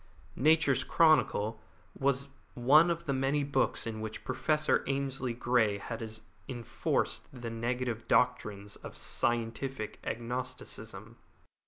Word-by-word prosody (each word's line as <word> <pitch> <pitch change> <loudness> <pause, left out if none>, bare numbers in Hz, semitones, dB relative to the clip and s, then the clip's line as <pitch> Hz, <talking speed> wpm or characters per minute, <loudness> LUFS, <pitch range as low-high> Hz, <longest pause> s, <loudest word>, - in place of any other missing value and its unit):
Nature's 155 -1 +4
Chronicle 115 -9 +3 0.3
was 140 0 0 0.3
one 145 +7 +6
of 170 0 -2
the 140 - 0
many 135 +2 +1
books 140 -1 0
in 110 -1 -4
which 110 0 -6
Professor 155 0 +1
Ainslie 135 -3 -1
Grey 115 -4 +2
had 115 +3 -5 0.5
enforced 120 -3 -1
the 120 -3 -6
negative 120 0 -2
doctrines 105 -5 +1
of - - -10
scientific 120 0 -2
agnosticism. 125 +2 -5
125 Hz, 110 wpm, -31 LUFS, 115-140 Hz, 0.5 s, one